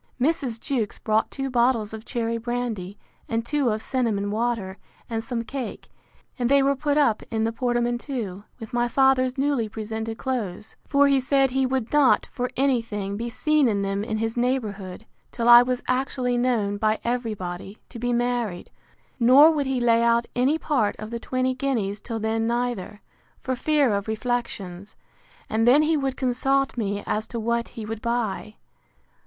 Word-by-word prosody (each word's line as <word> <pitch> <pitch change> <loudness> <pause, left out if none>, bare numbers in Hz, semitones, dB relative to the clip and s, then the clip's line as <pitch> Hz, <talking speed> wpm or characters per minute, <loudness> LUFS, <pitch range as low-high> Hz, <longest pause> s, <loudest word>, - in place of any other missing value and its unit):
Mrs. 265 -4 0
Jewkes 230 -6 -2
brought 220 0 +1
two 270 -1 -4
bottles 235 -3 +2
of 220 +1 -8
cherry 230 -2 -2
brandy, 230 -5 -3 0.3
and 230 0 -1
two 285 -1 +1
of 215 0 -2
cinnamon 220 -6 -1
water, 215 -4 -2 0.3
and 225 -1 -3
some 235 -1 -3
cake; 260 0 -6 0.5
and 245 -1 +1
they 280 0 +5
were 280 +1 +2
put 290 +2 0
up 235 -8 +3
in 220 -1 -1
the 225 - +1
portmanteau, 240 -4 -2 0.2
with 225 +1 -9
my 240 0 +2
father's 260 +1 +3
newly 270 -5 0
presented 220 +1 -5
clothes; 215 -6 -4
for 285 0 +4
he 275 -1 +4
said, 270 0 +2
He 265 0 +1
would 255 -2 -2
not, 295 -3 +4
for 250 0 -2
any 265 -2 +3
thing, 205 -3 -4
be 235 +3 -3
seen 305 +3 +2
in 200 -3 0
them 195 +1 -1
in 220 0 -2
his 225 +1 -2
neighbourhood, 220 -6 -2 0.3
till 235 -1 -2
I 240 0 +10
was 250 0 -1
actually 255 -1 0
known, 235 -5 +1
by 215 +1 +1
every 240 -2 -1
body, 185 +2 -7
to 235 - -9
be 245 +1 -1
married; 240 -6 -1 0.5
nor 265 +7 +7
would 290 -4 -1
he 265 -1 0
lay 230 -1 +3
out 235 0 +3
any 260 +6 +2
part 260 -10 0
of 215 +1 -8
the 235 - -3
twenty 255 +1 -1
guineas 235 -7 -2
till 225 +2 -5
then 225 +1 0
neither, 235 -4 -2 0.4
for 260 - -2
fear 285 -3 +2
of 200 +1 -2
reflections; 215 -5 -3 0.5
and 225 +2 +1
then 280 +5 +6
he 320 +1 +2
would 270 -3 -1
consult 270 +1 +1
me 205 -3 -2
as 215 +1 -2
to 235 - -5
what 235 +1 -1
he 220 - -5
would 220 0 -5
buy. 235 -3 -2
240 Hz, 180 wpm, -24 LUFS, 220-260 Hz, 0.5 s, I